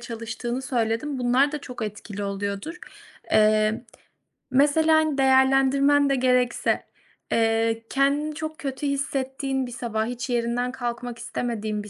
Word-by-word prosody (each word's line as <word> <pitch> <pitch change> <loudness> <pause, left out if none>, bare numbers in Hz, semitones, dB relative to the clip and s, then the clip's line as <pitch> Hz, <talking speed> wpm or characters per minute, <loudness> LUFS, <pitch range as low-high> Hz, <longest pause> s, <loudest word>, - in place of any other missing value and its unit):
çalıştığını 235 +2 -5
söyledin. 245 +2 -1
Bunlar 250 +4 +2
da 300 - -2
çok 250 -3 -8
etkili 210 -1 -6
oluyordur. 200 - -4 0.5
Eee, 215 +1 +3 0.7
mesela, 295 +4 +4
hani, 310 -2 +2
değerlendirmen 270 +2 +4
de 275 - +2
gerekse, 250 -1 +1 0.5
eee, 225 0 +1
kendini 285 +3 +1
çok 315 0 -5
kötü 280 -2 -4
hissettiğin 270 -1 -2
bir - - -9
sabah, 225 -2 -2
hiç 245 +2 -5
yerinden 240 +1 0
kalkmak 240 -1 -5
istemediğin 220 -3 -3
bir 210 - -11
250 Hz, 125 wpm, -24 LUFS, 230-275 Hz, 0.7 s, mesela